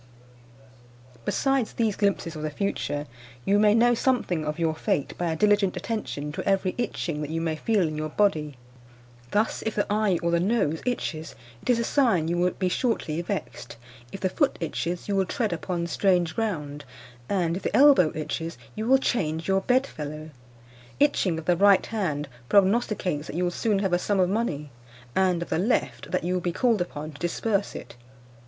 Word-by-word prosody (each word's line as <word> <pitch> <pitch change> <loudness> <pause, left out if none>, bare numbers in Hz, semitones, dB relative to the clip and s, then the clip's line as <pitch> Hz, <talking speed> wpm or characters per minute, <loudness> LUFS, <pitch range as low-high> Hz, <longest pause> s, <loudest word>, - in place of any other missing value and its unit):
Besides 270 -4 +1
these 220 -4 0
glimpses 200 -5 0
of 155 - -6
the 155 - -2
future, 150 -4 -2 0.4
you 205 +1 +3
may 210 0 +5
know 240 +1 +5
something 230 -10 0
of 150 +1 -3
your 165 -2 +1
fate 145 -2 -1
by 175 -2 -1
a - - -1
diligent 205 0 +2
attention 180 -7 -4
to - - -5
every 195 -1 +1
itching 170 -9 -2
that 150 - -4
you 165 +1 -2
may 165 -1 -1
feel 200 +1 +1
in 155 - -4
your 155 0 -3
body. 155 -6 +1 0.7
Thus, 210 - 0
if 220 - -2
the 205 - +1
eye 210 -4 +2
or 170 - +1
the 170 - +3
nose 180 -5 +1
itches, 160 -10 -3 0.3
it - - -7
is 245 - +5
a 235 - 0
sign 225 - +2
you 170 +1 0
will 180 +1 +3
be 185 +1 -2
shortly 180 -6 -1
vexed; 175 - -5 0.3
if 195 - -7
the 190 - 0
foot - - +1
itches, 170 +1 -3
you 200 - 0
will 190 -1 +2
tread 220 -7 -1
upon 170 0 -3
strange 175 -2 +1
ground; 150 -10 -3 0.5
and 175 -4 +1
if - - -6
the - - 0
elbow 270 - +6
itches, 165 +2 -4 0.2
you 220 +1 -4
will 265 +2 +6
change 160 -11 -1
your 195 0 +2
bedfellow. 155 - -1 0.7
Itching 205 - +2
of 160 - -6
the 175 - +3
right 200 +1 +5
hand 155 -10 -2 0.2
prognosticates 195 -5 +2
that - - -7
you 180 - 0
will 175 - +1
soon 210 +3 0
have 195 -2 0
a 175 - +3
sum 200 +1 0
of 180 -1 +3
money; 150 -10 -2 0.4
and, 180 -2 +2
of - - -12
the - - 0
left, 215 +7 0
that 185 - -1
you 180 +1 -1
will 180 - 0
be 175 - -1
called 230 +1 +2
upon 155 -3 -5
to 145 - -14
disburse 200 +4 -1
it. - - -9
180 Hz, 195 wpm, -26 LUFS, 160-210 Hz, 0.7 s, elbow